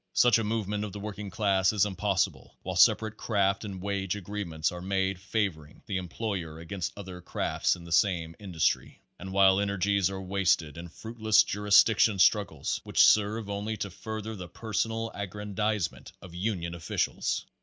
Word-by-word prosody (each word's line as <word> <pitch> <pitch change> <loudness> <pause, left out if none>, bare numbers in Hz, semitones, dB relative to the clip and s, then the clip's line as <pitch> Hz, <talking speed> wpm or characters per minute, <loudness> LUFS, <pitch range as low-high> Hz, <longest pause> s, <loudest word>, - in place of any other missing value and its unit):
Such 120 -2 +5
a - - -1
movement 105 -1 -2
of 105 - -5
the 105 - -6
working 105 0 -6
class 95 -2 +2
is 105 -2 +3
impossible 95 -1 -1
while - - -4
separate 110 -1 +4
craft 100 -2 0
and 100 -3 -6
wage 100 -1 -2
agreements 90 -6 -3
are 90 0 -7
made 95 0 -1
favoring 95 -7 -3
the 100 - -2
employer 90 -3 -4
against 85 +1 -4
other 95 -3 -8
crafts - - 0
in 85 - -12
the 85 - -11
same 85 -3 +2
industry, 90 -6 -1 0.2
and 95 +1 -7
while 95 0 +5
energies 100 -1 +1
are 95 -1 -5
wasted 90 -6 0
in 85 +1 -8
fruitless 110 +3 +2
jurisdiction 105 +1 +4
struggles 95 -7 +2
which - - +4
serve 105 +1 +3
only 100 +2 -3
to 100 -1 -4
fur 110 +3 -6
ther 110 +1 -6
the 90 -3 -7
personal 115 +1 -2
aggrandizement 105 -1 -3
of 90 -3 -12
union 90 -2 -2
officials. 85 -1 -2
100 Hz, 165 wpm, -28 LUFS, 90-105 Hz, 0.2 s, Such